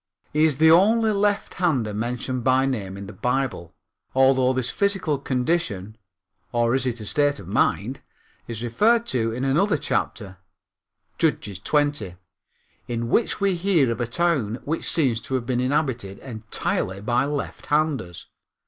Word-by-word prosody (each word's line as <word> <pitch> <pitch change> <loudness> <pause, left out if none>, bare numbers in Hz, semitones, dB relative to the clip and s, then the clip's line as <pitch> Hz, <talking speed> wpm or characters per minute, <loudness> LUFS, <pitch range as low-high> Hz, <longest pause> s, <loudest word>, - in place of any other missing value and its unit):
He 155 +1 +4
is 150 -4 +1
the 160 +1 +6
only 220 +6 +5
lefthander 180 - 0
mentioned 120 +3 -3
by 130 +1 +3
name 100 -8 -3
in 100 - -7
the 100 - -9
Bible, 125 -6 -2 0.4
although 130 -1 +4
this 130 -2 -1
physical 195 -8 0
condition 125 - -1 0.6
or 120 0 +1
is 130 -1 +1
it 120 -1 -2
a - - -7
state 145 +5 +2
of 90 - -11
mind 95 - 0 0.5
is 115 -1 -5
referred 225 - +3
to 115 - 0
in 125 +3 -4
another 160 +6 +2
chapter 100 -8 -3 0.8
(Judges 100 -3 0
20) 145 - 0 0.7
in 115 -1 -3
which 230 - +1
we 200 -1 +2
hear 170 -8 +2
of 115 - -3
a 120 - -1
town 135 -6 0
which 160 +3 -2
seems 130 -8 +2
to 130 +3 -4
have 125 -2 -2
been 125 -1 0
inhabited 125 -7 -1
entirely 110 -5 -3
by 120 +5 +1
lefthanders. 145 - -2
130 Hz, 150 wpm, -24 LUFS, 115-155 Hz, 0.8 s, the